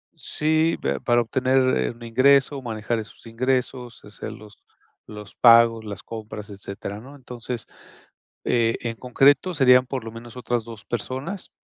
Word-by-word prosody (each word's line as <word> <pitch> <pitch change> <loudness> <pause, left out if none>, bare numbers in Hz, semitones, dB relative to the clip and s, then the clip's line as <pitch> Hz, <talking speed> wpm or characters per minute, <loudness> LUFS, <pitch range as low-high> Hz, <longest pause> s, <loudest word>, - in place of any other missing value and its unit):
Sí, 155 +2 0
pero - - -2
para 120 -1 +3
obtener, 130 +3 0 0.2
eh, - - 0
un 120 0 -14
ingreso, 135 +3 +3
manejar 115 -1 -3
esos 105 +1 -11
ingresos, 125 0 -2
hacer 105 -1 -8
los 105 -1 -13 0.5
los 105 -1 -10
pagos, 115 -1 +6
las 100 -2 -7
compras, 110 -2 -8
etcétera, 100 +1 -7
¿no? 135 +5 -13
Entonces, 125 -3 -7 0.8
eh, 115 -1 +2
en 115 -1 -4
concreto, 135 +8 +3
serían 125 -4 +5
por 130 -3 -4
lo 115 - -7
menos 115 +2 -11
otras 120 -2 -2
2 115 -3 -11
personas. 130 - -5
120 Hz, 150 wpm, -23 LUFS, 110-130 Hz, 0.8 s, pagos